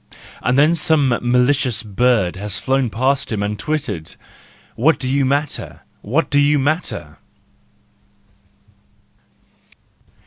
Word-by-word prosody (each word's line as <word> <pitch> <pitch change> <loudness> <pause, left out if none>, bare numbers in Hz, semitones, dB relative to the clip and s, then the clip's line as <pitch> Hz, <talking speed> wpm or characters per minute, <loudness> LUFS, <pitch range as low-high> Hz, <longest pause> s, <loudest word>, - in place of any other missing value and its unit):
—And 125 +1 +1
then 150 +4 +5
some 155 -4 +2
malicious 125 -1 +1
bird 105 -3 +1
has 100 +1 -3
flown 135 +3 0
past 130 +5 0
him 105 -2 -1
and 105 0 -3
twittered: 140 - -4 0.3
" - - -29
What 155 +7 +3
do 130 - -4
you 135 +1 +1
matter? 145 +3 -2 0.2
What 140 +11 -1
do 145 - +3
you 145 +1 +3
matter 155 +5 -2
130 Hz, 115 wpm, -19 LUFS, 110-145 Hz, 0.3 s, then